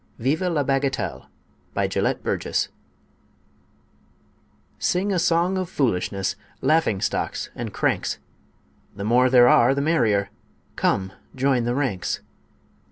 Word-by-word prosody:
VIVE 135 +8 0
LA 170 -5 +1
BAGATELLE 135 0 -1 0.5
BY - - +1
GELETT - - -1
BURGESS - - -1 2.1
Sing 190 +3 0
a 180 - +1
song 175 +2 +2
of 185 -2 -3
foolishness, 95 -6 -1 0.2
laughing 155 -11 +2
stocks - - -2
and - - -5
cranks! - - 0 0.8
The 100 - -5
more 125 +4 +4
there 125 -1 +7
are 125 +2 +5
the 140 - 0
merrier; 110 -11 +1 0.4
come 95 0 0 0.2
join 130 -2 +1
the 120 +1 0
ranks! 130 -11 -1
130 Hz, 115 wpm, -23 LUFS, 115-160 Hz, 2.1 s, there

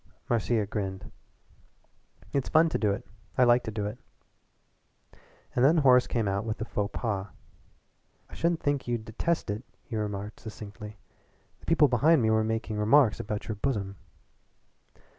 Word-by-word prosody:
Marcia 115 -2 +1
grinned. 95 -2 -5 1.2
"It's 140 -2 0
fun 165 +1 +5
to - - -1
do 105 - +2
it. 105 +5 -2 0.3
I 125 - +6
like 120 0 +5
to - - -3
do 105 -1 -3
it." 105 +5 -5 1.6
And 125 - +2
then 155 +5 +5
Horace 130 -4 +5
came 115 -4 -1
out 100 +1 -1
with 110 0 -4
a 110 - -3
FAUX 105 -3 -2
PAS. 100 -4 -2 1.0
"I - - -18
should 170 -1 0
think 145 -2 -1
you'd 120 -2 -2
detest 120 +3 -1
it," 105 +4 -5 0.2
he 115 - -7
remarked 105 0 -4
succinctly. 105 -1 -9 0.6
"The - - -19
people 160 -2 +5
behind 140 +3 +4
me 110 - +3
were 110 0 +3
making 110 -1 -2
remarks 115 +2 +4
about 105 0 -4
your 110 - -2
bosom." 100 -5 -2
110 Hz, 160 wpm, -28 LUFS, 105-130 Hz, 1.6 s, I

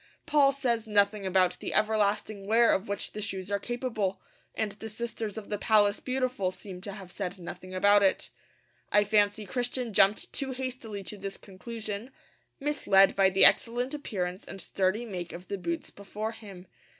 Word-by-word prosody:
Paul 290 -3 +4
says 240 -5 -1
nothing 205 -1 +2
about 185 -1 +2
the - - -4
everlasting 210 -1 +1
wear 230 +2 +5
of 190 - -1
which 200 0 -3
the 210 - -6
shoes 195 -2 -4
are 200 - +1
capable; 225 -4 -2 0.4
and 215 -2 -1
the 210 +2 -8
sisters 225 -1 -4
of 215 - -7
the 210 - -2
Palace 210 -2 +3
Beautiful 255 -7 -1
seem 185 0 -9
to 200 +1 -6
have 190 -3 -10
said 185 0 -4
nothing 185 +1 -8
about 205 +2 +5
it. 195 -1 +1 0.6
I 205 - +5
fancy 205 0 +2
Christian 245 +2 -2
jumped 195 +2 +3
too 270 -1 -2
hastily 250 -6 -5
to 210 - -8
this 195 0 -5
conclusion, 215 +3 -7 0.5
misled 240 -10 +4
by 195 -1 +5
the 190 0 +6
excellent 245 +3 +4
appearance 185 -10 -4
and 195 - -8
sturdy 190 +5 0
make 180 -6 -6
of 175 +2 -10
the 200 - -2
boots 170 -2 -4
before 210 +2 -5
him. 200 -5 -11
205 Hz, 175 wpm, -29 LUFS, 195-230 Hz, 0.6 s, the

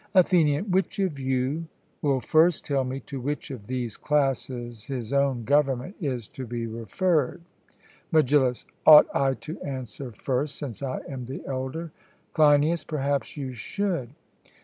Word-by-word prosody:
ATHENIAN: 175 -1 +4
Which 190 +1 +1
of 185 -8 -1
you 130 +5 -1 0.3
will 140 -4 +1
first 160 +4 +3
tell 140 -2 +1
me 130 +1 -4
to 135 +1 -7
which 145 +2 -3
of 110 -6 -8
these 125 -4 -3
classes 130 -5 -1
his 130 -3 -4
own 140 -4 +2
government 140 - +1
is 125 -8 -2
to 130 -2 -7
be 120 0 -3
referred? 145 - 0 0.7
MEGILLUS: 135 -5 +3 0.2
Ought 150 -1 +11
I 135 -1 +2
to 120 +8 -8
answer 130 -1 -6
first, 135 +6 -2
since 135 -6 -6
I 135 -2 -3
am 130 -3 -6
the 130 +3 -7
elder? 135 +5 -4 0.4
CLEINIAS: 150 +1 +4
Perhaps 140 -1 -2
you 135 -3 -4
should. 170 - -2
135 Hz, 145 wpm, -26 LUFS, 125-150 Hz, 0.7 s, Ought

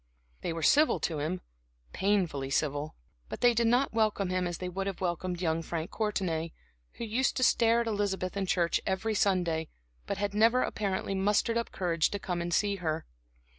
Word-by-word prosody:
They - - -2
were 165 -1 -4
civil 300 - +4
to 160 -3 -1
him 165 +5 -2 0.5
painfully 180 -9 0
civil; 145 +1 -1 0.3
but - - -6
they 245 -1 +6
did 235 0 +2
not 245 +3 +2
welcome 215 -4 +1
him 185 -1 0
as 175 - -4
they 180 - -4
would 190 +2 -3
have 195 - -4
welcomed 180 0 -2
young 160 -1 +1
Frank 165 0 -4
Courtenay, 175 -7 -1 0.4
who - - -7
used 235 +4 0
to 255 - +1
stare 230 -1 +4
at - - -2
Elizabeth 200 -4 -1
in 195 -1 -1
church 170 -2 +1
every 195 +4 0
Sunday, 175 -6 +1 0.4
but 200 - -2
had 200 0 -2
never 230 +4 +4
apparently 195 -2 -2
mustered 205 +4 +1
up 235 0 -1
courage 170 -4 +1
to 205 - -3
come 180 -3 -3
and 175 0 -3
see 200 +2 +1
her. 160 -3 -2
190 Hz, 190 wpm, -30 LUFS, 170-210 Hz, 0.5 s, they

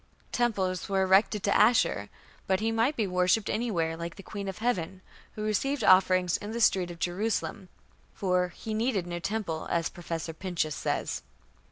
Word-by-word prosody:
Temples 195 -8 0
were 195 -1 +2
erected 195 +2 +3
to 200 - +2
Ashur, 230 +3 +3 0.4
but 190 -1 +2
he 225 +1 0
might 230 +6 +1
be 220 - 0
worshipped 180 +3 +2
anywhere, 175 -9 -1
like 170 +1 -6
the 195 - -11
Queen 200 0 -6
of 195 - -5
Heaven, 190 -6 -2 0.3
who 215 - -5
received 230 +5 0
offerings 185 -1 +5
in 205 - -7
the 235 - -3
streets 185 -5 +3
of 170 - -9
Jerusalem, 190 +1 -2 0.5
for 180 -2 +1
"he 215 +5 -6
needed 220 -4 0
no 175 0 -4
temple", 175 -4 -3
as 165 -2 0
Professor 165 -2 -5
Pinches 165 -3 -2
says. 65 - -2
190 Hz, 170 wpm, -28 LUFS, 175-220 Hz, 0.5 s, offerings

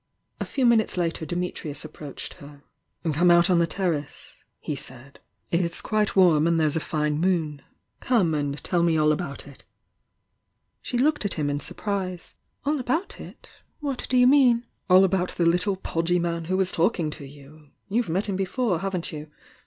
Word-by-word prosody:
A - - -2
few 265 - -1
minutes 225 -5 +3
later 165 -2 -1
Dimitnus 175 -4 -4
aPproached 150 -2 -8
her 145 -2 -13 0.5
"Come 175 +4 +3
out 175 +1 +5
on 175 - +4
the 170 - +2
terrace," 160 -5 -3 0.2
he 150 - -4
said 130 +1 -10 0.3
.J^LS"^ 185 +5 +1
warm 170 -5 +5
and 170 -1 +2
there's 155 -1 +2
a - - +2
fine 150 -1 -1
moon. 160 -5 0 0.4
Come 205 -10 +2
and 145 -1 -1
teU 175 -2 +1
me 170 -1 +2
all 155 0 +4
about 150 -2 -4
it!" 140 -2 -15 1.2
She 245 - -3
looked 295 +3 +2
at 205 - -1
him 145 -3 -1
in 145 - -2
surprise. 185 +2 -4 0.3
"All 295 +1 +1
about 290 +10 -2
it? - - -13 0.3
What 280 -4 -4
do 255 - +2
you 250 - +6
mean? 250 -3 +5 0.2
"AU 185 +1 +7
about 185 -1 0
the 170 - +1
little 180 +4 +2
pod^ 175 -1 0
man 170 -1 -2
who 185 +3 0
was 190 -1 +2
talkmg 170 -3 +1
to 145 - -8
you! 145 +2 -16 0.2
You've 225 0 0
met 185 +6 0
him 200 - -2
before, 195 0 -1
haven't 185 -2 -3
you? 150 -1 -8
175 Hz, 175 wpm, -25 LUFS, 155-195 Hz, 1.2 s, AU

